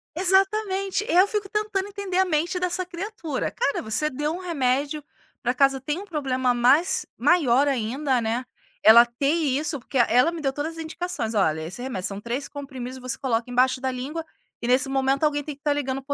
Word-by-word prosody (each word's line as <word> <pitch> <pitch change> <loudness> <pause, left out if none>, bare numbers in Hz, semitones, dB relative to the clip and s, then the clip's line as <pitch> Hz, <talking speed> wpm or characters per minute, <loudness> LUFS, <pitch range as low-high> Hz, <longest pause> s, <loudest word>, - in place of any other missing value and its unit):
Exatamente, 390 +2 +1
e - - -3
aí - - +3
eu 375 +2 +6
fico 410 -1 -2
tentando 420 -2 -2
entender 400 -3 -4
a 380 - +4
mente 345 +2 0
dessa 360 0 -1
criatura. 345 -5 -4
Cara, 280 - -1
você 220 +8 +1
deu 295 +3 -2
um 355 - -5
remédio 290 -3 -1 0.4
para 245 0 0
casa 270 0 +3
tem 295 +6 -3
um 405 - -8
problema 260 -7 0
mais 260 +9 +3
maior 285 -6 +3
ainda, 260 +1 0
né, 230 +3 -2 0.4
ela 235 +2 +9
ter 240 +4 -4
isso 300 -2 0
porque 260 +2 -5
ela 250 +6 +4
me 340 - -6
deu 270 -2 -1
todas 295 +4 -3
as 325 - -4
indicações, 320 -8 -4
olha 160 -7 +1
esse 170 +9 -6
remédio 245 -8 -2
são 200 +1 -7
3 240 +5 -3
comprimidos 260 -3 -7
você 255 -2 -3
coloca 240 -2 -1
embaixo 255 +1 +2
da 260 - 0
língua 270 +6 -4 0.4
e 235 - -3
nesse 255 +2 +4
momento 270 +1 0
alguém 290 -1 +1
tem 300 -1 -6
que 280 - -36
estar 295 -1 +1
ligando 270 -2 -2
para 285 +1 -3
280 Hz, 205 wpm, -24 LUFS, 255-345 Hz, 0.4 s, ela